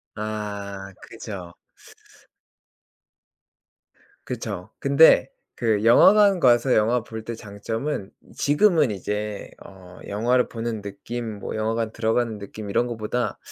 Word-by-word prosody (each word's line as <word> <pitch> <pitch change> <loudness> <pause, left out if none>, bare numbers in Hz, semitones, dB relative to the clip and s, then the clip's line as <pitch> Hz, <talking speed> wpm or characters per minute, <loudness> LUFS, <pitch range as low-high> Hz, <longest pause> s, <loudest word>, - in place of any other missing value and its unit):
아 100 -2 -5
그죠. 100 -6 -9 2.7
그쵸. 90 +4 -5
근데 140 +4 +5 0.3
그 110 -4 0
영화관 195 - +6
가서 125 -2 +4
영화 115 +2 +2
볼 110 0 -8
때 115 +1 -5
장점은 110 +2 -5 0.2
지금은 150 - +3
이제 105 +1 -4
어 90 -2 -14
영화를 120 +5 +1
보는 115 -2 -4
느낌 110 +3 -6
뭐 - - -5
영화관 110 +1 -1
들어가는 115 0 0
느낌 100 +1 -8
이런 120 +4 +1
것보다 115 -1 -3
110 Hz, 215 characters per minute, -24 LUFS, 105-120 Hz, 2.7 s, 영화관